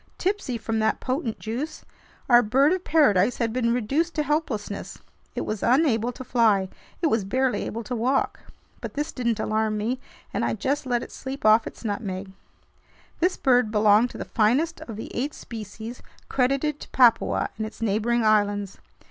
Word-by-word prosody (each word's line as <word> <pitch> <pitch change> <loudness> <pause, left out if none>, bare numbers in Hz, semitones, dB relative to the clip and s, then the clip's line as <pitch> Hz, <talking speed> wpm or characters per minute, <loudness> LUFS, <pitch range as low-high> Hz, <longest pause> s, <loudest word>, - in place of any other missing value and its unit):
Tipsy 380 - -1
from 225 0 -2
that 220 0 +1
potent 255 -3 -2
juice, 245 +8 -5 0.4
our 240 -1 +7
bird 270 +8 +3
of 370 -1 -2
paradise 245 - +3
had 230 -2 -1
been 235 -2 +1
reduced 275 +9 0
to 305 - +1
helplessness. 270 -9 -2 0.4
It - - -2
was 215 -2 -3
unable 245 -3 +3
to 260 - -8
fly. 215 -7 +2 0.3
It - - +4
was 225 -9 +2
barely 255 +6 0
able 230 +1 -5
to 245 +3 -4
walk. 255 +4 0 0.4
But - - -7
this 295 +2 -2
didn't 235 -3 -1
alarm 215 0 0
me, 235 +5 -1 0.3
and - - -1
I - - 0
just 270 +5 -1
let 240 -1 0
it - - -10
sleep 270 -1 -7
off 215 +1 +5
its - - -10
nutmeg. 200 -3 -4 0.9
This 360 +2 +1
bird 250 -4 +3
belonged 215 +2 +4
to - - -10
the - - -5
finest 260 +10 +1
of 225 - -7
the 220 - -7
eight 275 +5 -2
species 225 +1 -8 0.3
credited 275 +3 +1
to - - -10
Papua 240 -3 +3
and 220 - -1
its 215 - -12
neighboring 225 +2 +1
islands. 205 -2 +1
235 Hz, 175 wpm, -25 LUFS, 215-265 Hz, 0.9 s, our